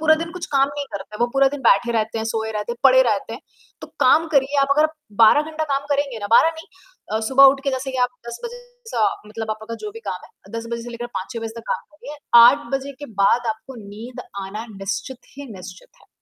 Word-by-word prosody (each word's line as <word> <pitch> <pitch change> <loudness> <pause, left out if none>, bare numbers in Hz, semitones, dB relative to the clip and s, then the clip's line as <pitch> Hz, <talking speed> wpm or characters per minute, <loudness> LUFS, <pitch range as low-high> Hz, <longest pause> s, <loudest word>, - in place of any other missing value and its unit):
पूरा 315 0 +5
दिन 330 +1 -5
कुछ 360 -1 -6
काम 275 0 +3
नहीं 285 0 -5
करते 200 +1 -7
हैं, - - -7
वो 240 - +4
पूरा 275 0 +4
दिन 290 - -6
बैठे 235 +1 +4
रहते 225 0 -1
हैं, 220 - -2
सोए 220 0 -2
रहते 210 +2 -3
हैं, - - -8
पड़े 260 -1 +7
रहते 225 -2 -1
हैं, 230 - -7 0.4
तो - - -8
काम 325 +1 +5
करिए, 280 +1 +2
आप 275 - +2
अगर 305 +1 +5 0.4
12 225 +7 +7
घंटा 315 0 -2
काम 280 +1 -3
करेंगे 280 -4 -2
ना, 205 - -4
12 - - +6
नहीं 320 - -10 0.5
अ, 220 - 0
सुबह 270 +1 +7
उठ 275 0 +6
के 275 - +1
जैसे 265 0 -3
कि 260 - -4
आप 250 - +3 0.2
10 235 0 -6
बजे 480 +1 -6 0.4
स - - +3 0.2
मतलब 220 +1 -6
आपका 220 +1 -5
जो 425 - -5
भी 455 - -10
काम - - -5
है - - -20
10 230 - -7
बजे 235 0 -3
से 240 - -8
लेकर 240 0 -6
5-6 230 +5 -5
बजे 225 0 -5
तक 230 - -7
काम - - -1 0.2
करिए, 300 0 -9 0.2
8 235 0 +6
बजे 270 +1 -2
के 290 - -6 0.2
बाद 240 +4 +3
आपको 220 +5 -13
नींद 225 +5 -9 0.3
आना 210 +4 -6
निश्चित 195 +6 -5 0.2
ही 285 0 -8
निश्चित 185 -1 -11
है। - - -23
245 Hz, 250 wpm, -21 LUFS, 220-280 Hz, 0.5 s, पड़े